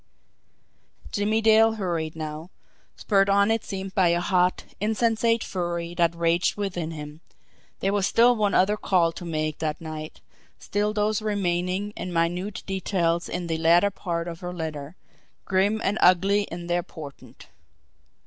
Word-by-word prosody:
Jimmie 215 +2 +1
Dale 220 0 +5
hurried 170 -7 -3
now, 155 +1 -6 0.5
spurred 195 -2 +2
on 200 +2 +4
it 225 0 0
seemed 195 -1 -6
by 185 -2 +3
a 170 0 +2
hot, 180 0 +1 0.2
insensate 225 +2 +1
fury 175 -2 -3
that 170 -1 +1
raged 170 +1 +1
within 180 -5 -3
him 150 -1 -8 0.6
there 195 +1 +1
was 200 -1 +1
still 240 +1 +5
one 205 -3 +1
other 205 +3 +3
call 175 -5 +2
to 165 - -9
make 155 -2 -3
that 155 -2 -2
night 155 -1 -7 0.4
still 210 +1 -1
those 210 0 0
remaining 195 -1 -1
and 180 - -5
minute 175 +4 -1
details 180 -3 -1
in 175 0 -3
the 165 -1 -2
latter 170 +5 +4
part 170 -3 -4
of 170 -1 -6
her 180 0 -6
letter, 155 -1 -5 0.5
grim 200 +3 +1
and 205 +2 0
ugly 195 +3 +4
in 170 +1 -6
their 175 0 0
portent! 150 -4 -12
180 Hz, 150 wpm, -25 LUFS, 170-205 Hz, 0.6 s, Dale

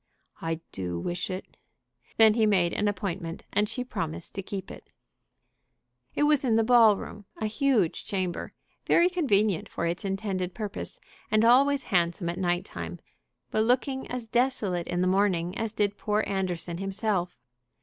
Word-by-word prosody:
"I 165 0 -2
do 90 -2 -4
wish 175 - -3
it." 185 0 -7 0.6
Then 220 -1 +7
he 220 -1 +3
made 180 -4 +3
an 210 - 0
appointment 185 -4 -3
and 205 +1 +2
she 250 - -1
promised 165 -9 -4
to 195 - -3
keep 195 0 -6
it. - - -12 1.3
It - - +2
was 295 -2 +3
in 235 -4 +2
the 225 - +4
ball 225 -3 +6
room, 210 +1 -9
a 220 - -2
huge 220 - +1
chamber, 185 -3 -3 0.4
very 350 +1 +4
convenient 215 - +1
for - - -3
its 170 +4 -2
intended 195 -2 -2
purpose, 215 - -6 0.3
and 215 +1 +3
always 270 +3 +5
handsome 170 0 +1
at 170 - -4
night 175 -1 0
time, 85 +1 -7 0.5
but 215 - +2
looking 255 +3 +1
as 250 -2 -4
desolate 225 -7 0
in 175 0 -1
the 185 - +2
morning 185 -2 +1
as 225 0 -2
did 205 -2 0
poor 210 0 +1
Anderson 180 -3 -2
himself. 195 -2 -2
200 Hz, 160 wpm, -27 LUFS, 175-225 Hz, 1.3 s, Then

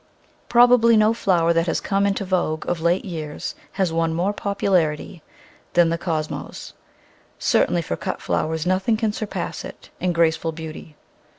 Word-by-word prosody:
Probably 240 -1 +6
no 215 +1 +4
flower 170 -6 +2
that 165 +1 +1
has - - 0
come 200 0 +1
into 195 0 -1
vogue 175 -4 -1
of 175 -2 -1
late 170 +3 +1
years 155 -5 -5 0.2
has 190 -4 0
won 165 0 0
more 185 +5 0
popularity 185 -5 -1 0.5
than 175 -1 +4
the 165 - 0
Cosmos 155 -4 -4 0.3
— - - -32 0.2
certainly - - +2
for - - -3
cut - - -4
flowers 160 0 -1
nothing 190 +5 +1
can 215 -2 0
surpass 195 -5 -4
it - - -11
in 180 0 0
graceful 165 -1 +1
beauty. 155 -1 -9
175 Hz, 160 wpm, -22 LUFS, 165-200 Hz, 0.5 s, Probably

